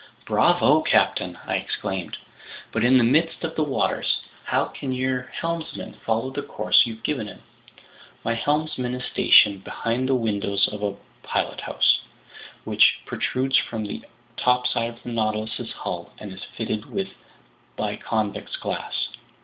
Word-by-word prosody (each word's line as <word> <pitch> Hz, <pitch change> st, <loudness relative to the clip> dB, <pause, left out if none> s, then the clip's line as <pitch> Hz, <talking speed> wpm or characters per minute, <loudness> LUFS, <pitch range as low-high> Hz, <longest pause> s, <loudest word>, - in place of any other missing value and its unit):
"Bravo, -, -, +4 dB
captain!" -, -, +2 dB
I -, -, +1 dB
exclaimed. 95 Hz, -2 st, -3 dB, 0.5 s
"But -, -, 0 dB
in 130 Hz, +2 st, +6 dB
the 125 Hz, -, +5 dB
midst 155 Hz, +10 st, +2 dB
of 165 Hz, -1 st, -2 dB
the 155 Hz, -, +2 dB
waters, 140 Hz, -3 st, 0 dB, 0.2 s
how -, -, +2 dB
can 135 Hz, -, -5 dB
your 130 Hz, 0 st, -1 dB
helmsman 165 Hz, -1 st, -4 dB
follow 115 Hz, +3 st, -1 dB
the 145 Hz, -, -3 dB
course 135 Hz, -, +3 dB
you've 115 Hz, 0 st, -8 dB
given 130 Hz, -7 st, -1 dB
him?" 100 Hz, -, -11 dB, 0.8 s
"My 115 Hz, -, +1 dB
helmsman 130 Hz, 0 st, 0 dB
is 125 Hz, -, -5 dB
stationed 100 Hz, -2 st, +5 dB
behind 120 Hz, +6 st, -1 dB
the 135 Hz, -, +4 dB
windows 100 Hz, -4 st, +1 dB
of 105 Hz, -1 st, -6 dB
a 100 Hz, -1 st, -1 dB, 0.3 s
pilothouse, -, -, +1 dB, 0.6 s
which -, -, +4 dB
protrudes 130 Hz, +1 st, +1 dB
from 110 Hz, -2 st, -1 dB
the 100 Hz, -, -5 dB, 0.4 s
topside 125 Hz, -2 st, +2 dB
of 120 Hz, 0 st, -13 dB
the -, -, -6 dB
Nautilus's 110 Hz, -1 st, -2 dB
hull -, -, -5 dB
and 100 Hz, -3 st, -8 dB
is 95 Hz, -, -9 dB
fitted 110 Hz, -2 st, -4 dB
with 195 Hz, -1 st, -2 dB, 0.7 s
biconvex -, -, -2 dB
glass." -, -, -2 dB
120 Hz, 140 wpm, -24 LUFS, 110-130 Hz, 0.8 s, in